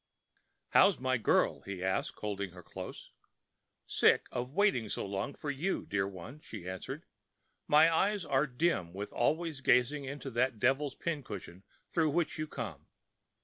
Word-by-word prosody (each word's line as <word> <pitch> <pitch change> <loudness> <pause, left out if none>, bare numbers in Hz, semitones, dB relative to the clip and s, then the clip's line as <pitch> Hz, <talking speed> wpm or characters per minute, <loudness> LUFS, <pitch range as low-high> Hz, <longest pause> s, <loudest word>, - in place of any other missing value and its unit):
"How's 195 -2 +5
my 130 0 +1
girl?" 115 - +2
he 95 -2 -6
asked, 95 0 -1
holding 100 -3 -3
her 90 -1 -11
close. - - -8 0.7
"Sick - - +4
of 125 +1 -3
waiting 195 - +3
so - - -2
long 100 +7 -3
for 145 - -3
you, 160 +8 -1
dear 100 -1 0
one," 100 - -9
she 90 - -9
answered. 95 -1 -6 0.6
"My 160 +2 +6
eyes 200 +1 +1
are 135 +2 +2
dim 125 - 0
with 100 +2 -6
always 155 +3 0
gazing 130 +3 +3
into 140 0 -6
that 125 0 +1
devil's 135 +4 +2
pincushion 105 - -5 0.3
through 160 -2 +2
which 165 +1 0
you 155 - -2
come. 110 - -6
130 Hz, 150 wpm, -32 LUFS, 100-150 Hz, 0.7 s, My